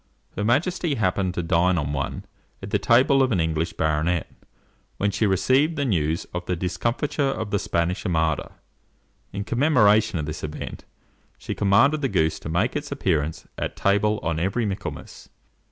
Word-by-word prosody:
Her - - -2
majesty 155 - +1
happened 95 -4 0
to 85 - -2
dine 90 +2 +2
on 75 -2 -2
one 70 -2 -3 0.4
at 100 - -7
the 105 - +2
table 130 +5 +4
of 130 -1 +2
an 95 - +1
English 80 +1 -1
baronet, 80 +2 0 0.7
when 100 0 +1
she 105 +2 +1
received 130 - +2
the 145 -2 -1
news 80 - 0
of 90 0 -3
the 90 - 0
discomfiture 115 - -2
of 110 -6 -4
the 100 - +1
Spanish 85 +2 -1
Armada. 80 -5 0 0.8
In 100 +1 -4
commemoration 110 - +3
of 75 - -2
this 75 0 -6
event, 75 0 -6 0.5
she - - -5
commanded 135 +10 +3
the 135 - 0
goose 80 -6 +1
to - - -7
make 90 +9 0
its 145 -1 -4
appearance 80 - -1
at - - -3
table 105 +2 +2
on 80 -1 -1
every 95 +7 0
Michaelmas. 100 -2 -6
100 Hz, 170 wpm, -24 LUFS, 85-120 Hz, 0.8 s, table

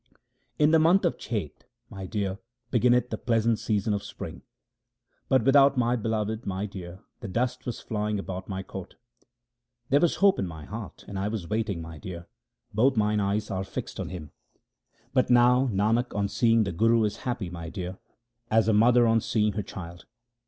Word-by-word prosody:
In 150 0 +4
the 160 - +6
month 175 +5 +4
of 170 - 0
Chet, 105 -11 -5 0.2
my 95 -1 -8
dear, 100 -2 -2 0.3
beginneth 125 0 +3
the - - -3
pleasant 115 -1 +1
season 105 -1 0
of 100 - -1
spring; - - -8 0.9
But 130 -3 +4
without 140 +1 +5
my 120 0 +2
Beloved, 110 -1 -2
my 95 +1 -2
dear, 95 -2 -8 0.2
the 115 - -6
dust 125 +6 -2
was 120 - -4
flying 105 -1 -2
about 95 -1 -6
my 95 -1 -3
court. 95 -1 -9 0.3
2 - - -35 0.6
There 140 - +5
was 170 +1 +2
hope 200 -1 +4
in 95 - -1
my 80 -3 -9
heart 110 -1 -8
and 100 -1 -5
I 100 - -1
was 105 -5 -4
waiting, 105 -5 -2
my 80 -1 -9
dear; 85 0 -7 0.5
both 125 +4 +3
mine 105 0 +2
eyes 105 +1 -1
were 95 0 -2
fixed 95 - -6
on - - -3
Him. 85 -5 -8 0.8
But 130 -2 +2
now 125 +2 +5
Nanak 110 +3 +1
on 100 -1 +1
seeing 115 +2 +3
the 100 - -2
Guru 115 +5 +3
is 105 - -1
happy, 115 -8 -4
my 85 -2 -6
dear, 90 0 -6 0.5
as 110 -1 +3
a 110 - +4
mother 120 +3 +5
on 115 0 +3
seeing 105 -1 +1
her 105 - -2
child. 85 -3 -9
105 Hz, 190 wpm, -27 LUFS, 95-120 Hz, 0.9 s, the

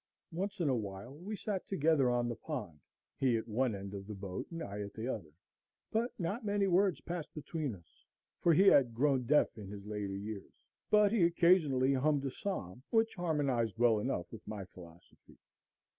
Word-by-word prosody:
Once 195 +4 -3
in 170 - +1
a 135 - +3
while 100 +2 -5
we 185 +9 -6
sat 200 -2 -3
together 155 -7 +3
on 120 0 +1
the 120 - -1
pond, 105 - -6 0.4
he 125 -4 +3
at 110 - -5
one 120 0 0
end 100 0 -7
of 100 -1 -7
the 105 - -6
boat, 95 -1 -5
and 165 -1 -5
I 100 +1 -5
at 100 0 -7
the 115 +2 -4
other; 100 -11 -4 0.6
but 230 +3 +1
not 195 +8 -2
many 205 -1 +1
words 190 -2 +3
passed 170 -3 -5
between 150 -5 -3
us, 85 -3 -21 0.4
for 170 - +4
he 165 +4 +6
had 130 -11 +6
grown 130 -1 +2
deaf 150 +2 +4
in 100 - -8
his 100 -1 -8
later 105 -2 -3
years, 105 0 -7 0.4
but 210 -1 +5
he 225 -3 +2
occasionally 170 -6 +4
hummed 140 +1 +2
a 135 - -1
psalm, 125 - -4
which 225 0 +2
harmonized 140 - 0
well 115 -2 +4
enough 105 -6 -1
with 115 - -9
my 105 -3 -5
philosophy. 85 -2 -16
130 Hz, 190 wpm, -34 LUFS, 105-170 Hz, 0.6 s, he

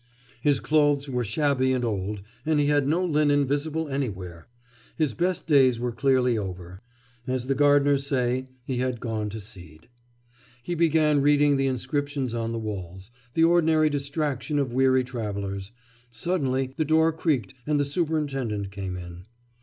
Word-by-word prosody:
His 145 0 +2
clothes 145 -2 +2
were 125 -2 -1
shabby 130 +3 +1
and 125 -1 0
old, 100 -2 -3 0.2
and 155 0 +1
he 145 - +3
had 145 -1 +2
no 170 +5 +1
linen 145 -3 +2
visible 155 +3 -1
anywhere. 95 - -5 0.5
His 155 -6 +1
best 180 +4 -1
days 135 -6 +4
were 120 0 -2
clearly 125 -2 +2
over: 90 -1 -7 0.5
as 130 -1 -1
the 135 - +1
gardeners 145 0 +3
say, 130 -1 0 0.2
he 130 -2 -2
had 125 -1 -1
gone 110 -3 -3
to 110 +2 -6
seed. 90 -5 -12 0.7
He 175 - -3
began 155 -3 +3
reading 145 0 +4
the 135 0 +1
inscriptions 140 0 -2
on 115 -1 -2
the 115 - -3
walls 95 -2 -6 0.2
the 165 - +4
ordinary 160 -2 +4
distraction 145 0 -2
of 135 -4 -1
weary 130 0 +3
travellers; 100 -5 -5 0.4
suddenly 130 0 -1
the 155 - +2
door 160 +2 +3
creaked 145 - -1
and 150 -1 +2
the 145 - +2
superintendent 140 - -2
came 95 -2 -5
in. 90 +1 -10
135 Hz, 155 wpm, -25 LUFS, 115-145 Hz, 0.7 s, days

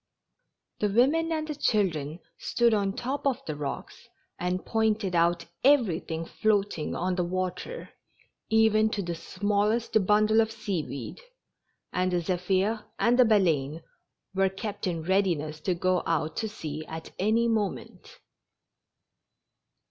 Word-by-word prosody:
The 210 - +1
women 285 +10 +3
and 310 -2 -3
chil 210 -3 +3
dren 155 -2 -5 0.2
stood 235 -1 +2
on 200 -2 +2
the 195 - -6
tops 270 +3 -2
of 270 0 -1
the 155 - -3
rocks 145 -1 -6 0.3
and 180 +1 -2
pointed 220 -4 +1
out 170 0 +2 0.2
everything 180 - +2
floating 205 -5 0
on 185 +1 -1
the 180 0 0
water, 185 - -4 0.6
even 220 0 +4
to 200 - -1
the 175 -1 -3
smallest 205 +5 0
bundle 215 +1 +5
of 220 0 -1
sea 205 -6 -2
weed, 140 - -7 0.7
and 185 0 +1
the 175 - +2
Zephir 190 +5 0
and 240 +2 +3
the 250 - +8
Baleine 165 -8 +2 0.5
were 195 0 +2
kept 195 +1 -5
in 165 -3 -2
readiness 170 -5 0
to 180 +3 -1
go 185 +1 +1
out 160 -1 0
to 220 - -1
sea 155 -7 -6
at 160 0 -7
any 220 +4 +2
moment. 225 - -3
195 Hz, 140 wpm, -28 LUFS, 170-220 Hz, 0.7 s, the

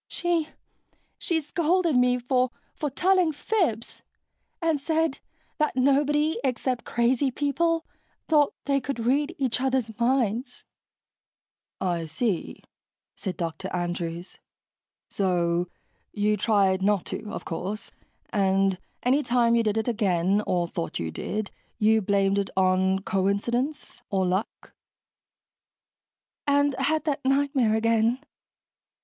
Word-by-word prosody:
She... 340 -3 -1 0.7
she 335 -3 0
scolded 335 +1 +1
me 250 0 +4
for... 250 +1 +1 0.2
for 300 - -3
telling 365 +4 +2
fibs... 300 - -1 0.6
and 325 -3 +1
said 320 0 0 0.4
that 305 -3 +1
nobody 290 +4 +2
except 255 -1 -1
crazy 245 +3 +1
people 320 +5 0 0.4
thought 300 -3 +3
they 275 -1 +1
could 275 0 -4
read 290 +7 +1
each 255 -3 0
other's 260 -4 0
minds." 240 -1 0 1.1
"I 170 -3 -1
see," 185 +3 -2 0.5
said 190 -3 -5
Dr. 170 +2 -4
Andrews, 175 0 -4 0.7
"So 175 -2 0 0.4
you 210 0 +1
tried 195 -2 +2
not 200 -1 +2
to, 210 - -5
of 220 - -6
course. 190 +5 -5 0.4
And 195 -2 +2 0.2
anytime 245 -3 +3
you 235 - +4
did 215 -1 0
it 220 - -1
again, 200 -4 +1
or 175 -1 +1
thought 85 - -4
you 80 -1 -3
did, 210 - -4 0.3
you 220 0 +4
blamed 200 0 +2
it 200 - -2
on 190 0 +2
coincidence. 235 +9 -1
Or 190 -2 +1
luck." 185 +4 -3 1.7
"And 285 0 +3
had 305 +4 +1
that 290 -2 -2
nightmare 270 -4 +2
again." 230 +1 +2
235 Hz, 115 wpm, -26 LUFS, 195-280 Hz, 1.7 s, me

